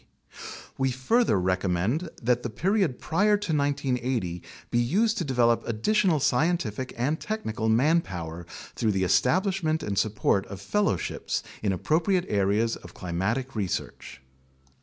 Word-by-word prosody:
We 135 0 +2
further 130 - +2
recommend 95 - 0
that 120 +1 +2
the 120 - -4
period 185 - 0
prior 205 +6 +2
to 200 -6 -2
1980 130 - -1 0.3
be 120 - +2
used 215 - +2
to - - 0
develop 120 -5 +2
additional 175 - +2
scientific 135 - 0
and 145 +7 0
technical 110 - -2
manpower 95 - 0 0.3
through 110 -3 0
the 95 -1 0
establishment 160 - +1
and 100 -2 -1
support 105 -2 +1
of 100 -1 -8
fellowships 100 - -1 0.2
in 100 - +1
appropriate 170 - +1
areas 105 +3 +1
of - - -14
climatic 110 +10 -2
research. 95 - -4
125 Hz, 125 wpm, -26 LUFS, 100-165 Hz, 0.3 s, We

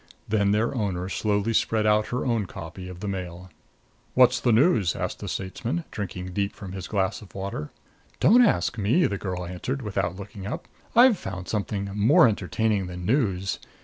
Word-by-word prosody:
Then 100 -2 +2
their 105 +5 +1
owner 95 -6 -2
slowly 105 +2 0
spread 110 -1 +1
out 105 0 +3
her 125 - -2
own 115 -6 0
copy 85 +2 -8
of 90 0 -9
the 105 - -4
Mail. 90 -2 -5 0.6
"What's 125 0 +5
the 120 - +2
news?" 115 - +3
asked - - -3
the - - -6
statesman, 115 - -3
drinking 90 -3 -5
deep 100 +1 -1
from 95 -3 -8
his 95 -1 -6
glass 95 -1 -1
of 105 - -15
water. 95 -6 -4 0.5
"Don't 240 +6 +6
ask 115 - +1
me," 120 - +3
the 100 -1 -1
girl 90 -2 -4
answered, 125 +10 -4
without 95 -4 -1
looking 100 0 -8
up. 110 - -5 0.3
"I've 240 -3 +7
found 95 -1 -6
something 100 -1 -2
more 105 +4 +6
entertaining 105 -1 0
than 90 0 -7
news. 100 -6 0
100 Hz, 180 wpm, -25 LUFS, 95-115 Hz, 0.6 s, I've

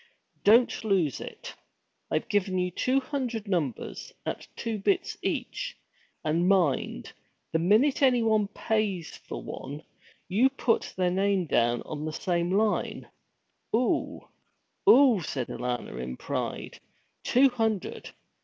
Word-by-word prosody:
Don't 230 +3 +5
lose 185 - +1
it. - - -8 0.6
I've - - -1
given 190 -2 +1
you 180 0 0
two 255 +9 +1
hundred 245 -6 -3
numbers, 165 - -2
at - - -4
two 225 -2 -3
bits 370 - 0
each, - - -3 0.5
and 165 +3 +1
mind, 160 - +1 0.4
the 160 - +1
minute 215 - +3
any 250 -4 +4
one 215 -2 +2
pays 205 -4 -2
for - - -8
one, 145 +3 -7 0.4
you 220 +8 +4
put 255 -3 0
their 180 -1 +2
name 195 0 +1
down 120 -5 +1
on 150 -1 -6
the 155 - -2
same 175 0 -1
line!' 210 +2 0 0.7
'Oo, 245 +2 0 0.7
oo!' 250 -6 +7
said 130 -5 -3
Alanna, 125 - -3
in 65 0 -5
pride. - - -4 0.4
'Two 270 +2 +5
hundred! 225 -5 -2
195 Hz, 125 wpm, -28 LUFS, 165-230 Hz, 0.7 s, oo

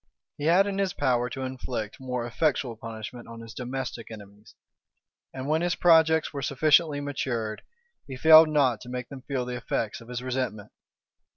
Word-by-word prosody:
He 145 - -3
had 175 +5 +5
it - - -2
in 195 - -3
his 195 -2 0
power 125 -3 +1
to 130 +2 -5
inflict 125 -4 -5
more 125 -2 -3
effectual 125 -1 0
punishment 115 +2 -8
on 115 0 -10
his 115 0 -10
domestic 125 -2 -5
enemies; 105 -1 -13 0.8
and 130 +1 -6
when 155 +2 +1
his 175 0 0
projects 160 -2 +4
were 140 - -4
sufficiently 150 +2 +3
matured, 120 -6 -3 0.5
he 130 -2 -7
failed 160 +2 +8
not 135 -7 +2
to 125 - -10
make 125 -1 -5
them 135 -2 -9
feel 130 -2 -3
the 125 0 -4
effects 115 -2 -3
of 115 - -14
his 125 0 -5
resentment. 125 -5 -3
130 Hz, 180 wpm, -27 LUFS, 120-145 Hz, 0.8 s, failed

